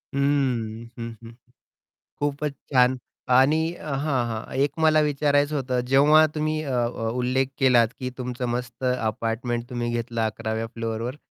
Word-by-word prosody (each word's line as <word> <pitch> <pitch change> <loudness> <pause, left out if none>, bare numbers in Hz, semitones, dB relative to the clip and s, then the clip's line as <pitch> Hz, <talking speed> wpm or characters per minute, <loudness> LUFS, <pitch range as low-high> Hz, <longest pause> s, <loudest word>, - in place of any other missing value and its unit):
हम्म. 125 -6 0
हं, 115 0 -4
हं, 115 - -11
हं. 115 - -12 0.9
खूपच 145 0 -1 0.2
छान. 125 0 +4 0.4
आणि 135 +5 +5 0.2
अ, 155 -4 -7
हां, 135 -3 0
हां. 110 -1 -5
एक 140 +2 +2
मला 155 -1 +5
विचारायचं 145 0 +2
होतं, 130 -2 -1
जेव्हा 145 +4 +6
तुम्ही 155 0 -1
अ 140 - -5
अ, 120 -2 -1
उल्लेख 130 +2 +1
केलात, 125 -4 +5
की 130 -1 -3
तुमचं 125 0 -3
मस्त 120 +1 -4
अपार्टमेंट 120 0 -1
तुम्ही 120 -1 -2
घेतलं 115 0 -2
11व्या 110 +1 -3
फ्लोरवर. 115 +3 -3
125 Hz, 150 wpm, -24 LUFS, 120-140 Hz, 0.9 s, जेव्हा